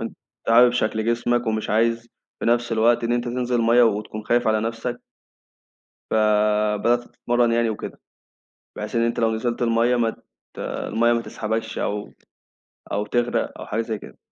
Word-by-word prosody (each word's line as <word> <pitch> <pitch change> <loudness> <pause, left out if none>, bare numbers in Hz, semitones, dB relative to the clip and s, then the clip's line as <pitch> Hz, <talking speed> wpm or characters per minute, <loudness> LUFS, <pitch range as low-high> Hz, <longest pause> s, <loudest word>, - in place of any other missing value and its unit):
أنت - - -6 0.3
عارف 120 +1 +6
شكل 110 -2 0
جسمك 120 +1 +1
ومش 110 -1 -1
عايز 115 +2 +1 0.3
في - - -2
نفس 120 0 +1
الوقت 115 +1 +3
إن 115 - 0
أنت 120 0 0
تنزل 125 0 -1
الميّة 115 +1 +4
وتكون 110 -1 0
خايف 120 +1 +1
على 110 -1 +2
نفسك. 115 +2 -3 1.1
فبدأت 105 +2 +2
تتمرن 120 0 0
يعني 115 -1 +2
وكده 110 - -7 0.8
بحيث 105 +1 -5
إن 115 - +3
أنت 115 - -1
لو 115 -1 +2
نزلت 120 +2 -2
الميّة 120 +1 +2
ما 115 -2 +2 0.4
ت - - -11
الميّة 120 +1 0
ما 115 - 0
تسحبكش 110 0 -4
أو 105 0 -3 0.8
أو 105 +1 -1
تغرق 120 +3 -1
أو - - -7
حاجة 110 +2 -1
زي 110 -1 -3
كده. - - -13
115 Hz, 165 wpm, -23 LUFS, 110-120 Hz, 1.1 s, عارف